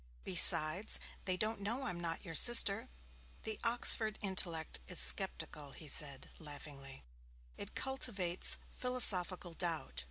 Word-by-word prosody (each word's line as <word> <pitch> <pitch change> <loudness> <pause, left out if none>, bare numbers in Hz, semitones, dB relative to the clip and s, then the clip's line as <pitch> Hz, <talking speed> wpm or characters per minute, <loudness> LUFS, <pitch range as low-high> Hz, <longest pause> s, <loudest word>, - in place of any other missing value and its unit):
'Besides, 155 - +3 0.3
they 185 -2 0
don't 215 +2 -3
know 230 +7 -5
I'm 180 -9 -6
not 165 +1 -6
your 165 - -10
sister.' 220 0 +3 0.5
'The 220 -1 -6
Oxford 230 -2 +4
intellect 175 -5 -4
is 180 - -5
sceptical,' 160 -7 -2
he 155 - -11
said, 140 -2 -2
laughing. 145 -3 -13 0.5
'It - - -9
cultivates 200 -10 -2 0.2
philosophical 185 -8 +2
doubt.' 160 - -6
180 Hz, 120 wpm, -33 LUFS, 155-215 Hz, 0.5 s, Oxford